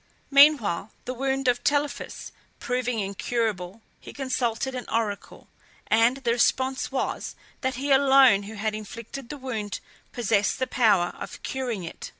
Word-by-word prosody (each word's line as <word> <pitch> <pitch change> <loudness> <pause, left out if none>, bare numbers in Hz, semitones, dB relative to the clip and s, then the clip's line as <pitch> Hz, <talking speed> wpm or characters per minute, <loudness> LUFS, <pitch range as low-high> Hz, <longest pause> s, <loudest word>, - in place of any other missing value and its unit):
Meanwhile, 275 - +5 0.2
the 255 - -3
wound 270 +1 -1
of 245 0 +2
Telephus 290 0 -1 0.3
proving 250 -1 -2
incurable, 205 -1 -2 0.2
he - - -11
consulted 260 -2 -2
an 250 -1 -5
oracle, 215 -3 -3 0.4
and 230 +4 +3
the 250 -4 -1
response 260 +3 +1
was, 265 - -3 0.3
that 260 -1 -1
he 275 +3 -2
alone 270 -6 +6
who 220 - -8
had 215 +1 -2
inflicted 230 +4 -8
the 295 - -6
wound 220 -7 -4 0.3
possessed 215 -4 +1
the 260 - 0
power 220 -9 +2
of - - -8
curing 245 -7 -3
it. 165 - -8
245 Hz, 145 wpm, -26 LUFS, 215-265 Hz, 0.4 s, alone